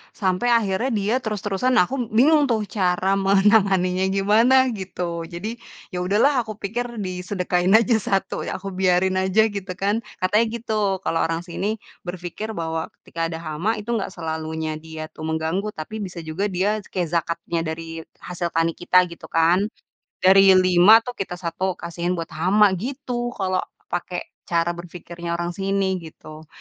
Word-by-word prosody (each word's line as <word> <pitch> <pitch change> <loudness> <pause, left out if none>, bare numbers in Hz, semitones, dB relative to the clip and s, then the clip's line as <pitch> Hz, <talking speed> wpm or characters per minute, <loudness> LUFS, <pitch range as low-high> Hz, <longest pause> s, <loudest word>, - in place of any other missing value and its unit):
sampai 190 +3 0
akhirnya 230 0 +2
dia 205 +4 0
terus-terusan 215 +2 -1
nah, 205 - +6
aku 250 -4 -2
bingung 285 +6 +4
tuh 220 -3 +1
cara 190 0 +2
menanganinya 195 -2 +3
gimana 215 +6 +4 0.2
gitu. 170 -3 -4
Jadi, 205 +8 -6 0.3
ya 180 - -3
udah 195 +4 +1
lah 285 +2 +5
aku 220 -3 -4
pikir 235 +5 -2 0.2
disedekahin 180 0 0
aja 230 +1 +5
1, 195 -1 -1
aku 190 +1 -5
biarin 185 0 +3
aja 190 +3 +3
gitu 195 -1 -4
kan. 205 +4 0 0.2
Katanya 210 +5 +3
gitu, 230 -1 -4 0.3
kalau 165 - 0
orang 165 +1 -2
sini 195 +4 -2 0.3
berpikir 180 +5 -5
bahwa 160 -1 -3
ketika 165 0 -4
ada 165 0 -6
hama 165 +8 -1
itu 215 +3 -5
gak - - -3
selalunya 160 -1 -4
dia 160 0 -8
tu - - -20
mengganggu. 160 +6 -1
Tapi 215 +8 -6
bisa 180 -4 -6
juga 160 +6 -2
dia 200 +3 0
kayak 185 -3 -3
zakatnya 170 0 -1
dari 165 0 -5 0.2
hasil 175 -1 -3
tani 165 0 +2
kita 180 +2 +3
gitu 170 - -10
kan. 170 +5 +3 0.6
Dari 195 0 +7
5 185 +4 +7
tuh 245 +1 -8
kita 185 -2 -3
1 180 +1 -2
kasihin 170 +1 -3
buat 165 -2 -5
hama 190 +6 +4
gitu 245 +1 -4
kalau 185 -2 -1 0.3
pakai 175 0 -3 0.2
cara 170 0 +1
berpikirnya 170 0 -6
orang 175 0 -2
sini 195 0 0
gitu. 155 -1 -12
185 Hz, 160 wpm, -23 LUFS, 170-210 Hz, 0.6 s, Dari